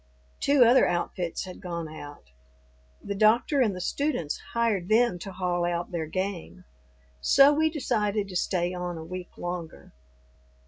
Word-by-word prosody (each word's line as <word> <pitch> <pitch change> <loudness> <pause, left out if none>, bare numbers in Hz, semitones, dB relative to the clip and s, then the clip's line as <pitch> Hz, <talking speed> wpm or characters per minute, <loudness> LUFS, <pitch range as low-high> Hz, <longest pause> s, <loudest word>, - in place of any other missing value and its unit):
Two 280 -3 +5
other 245 +3 +5
outfits 175 0 -2
had 185 - -10
gone 170 -2 -4
out. 145 - -11 0.7
The 200 - -3
doctor 225 +7 +3
and 215 -6 +2
the - - -6
students 245 - -2
hired 220 -6 0
them 220 -4 +3
to 195 - -7
haul 180 -1 -1
out 175 0 -2
their 165 -3 -3
game. 185 0 -4 0.6
So 275 - +6
we 315 +2 +2
decided 215 -9 -1
to 185 - -8
stay 175 0 0
on 180 -1 -4
a 160 - -7
week 180 +1 -8
longer. 175 -2 -6
185 Hz, 150 wpm, -27 LUFS, 175-230 Hz, 0.7 s, So